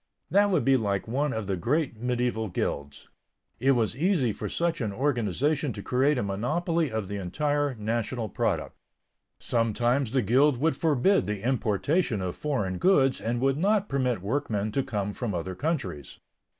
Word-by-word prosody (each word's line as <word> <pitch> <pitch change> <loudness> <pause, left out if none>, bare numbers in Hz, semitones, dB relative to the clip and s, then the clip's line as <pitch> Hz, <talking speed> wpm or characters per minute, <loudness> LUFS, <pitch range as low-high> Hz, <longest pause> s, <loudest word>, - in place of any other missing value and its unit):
That 205 +1 +4
would 170 -11 +1
be 135 -1 +5
like 100 -4 -1
one 140 +5 0
of 110 -3 -3
the 95 0 -1
great 135 - 0
medieval 120 -1 -1
guilds. 70 -5 -4 0.5
It 135 +3 +4
was 115 -3 0
easy 150 - +1
for - - -5
such 170 -3 -1
an 110 -3 -1
organization 135 - 0
to - - -7
create 135 +3 +2
a 125 - 0
monopoly 155 - -1
of 110 -3 -2
the 100 +1 -4
entire 145 - -1
national 115 +1 -2
product. - - -2 0.6
Sometimes 120 +3 +1
the 130 +1 +1
guild 130 +6 +4
would 155 +6 +1
forbid 165 - +2
the 105 +2 -3
importation 125 - +1
of 90 -2 -3
foreign 105 -12 -2
goods 135 -9 +3
and 120 +1 -1
would 135 +2 +1
not 205 +2 +2
permit 125 -8 0
workmen 110 -3 -1
to 135 - +1
come 105 -5 -3
from 110 -5 -3
other 85 +2 -3
countries. 135 - -3
125 Hz, 165 wpm, -27 LUFS, 105-145 Hz, 0.6 s, be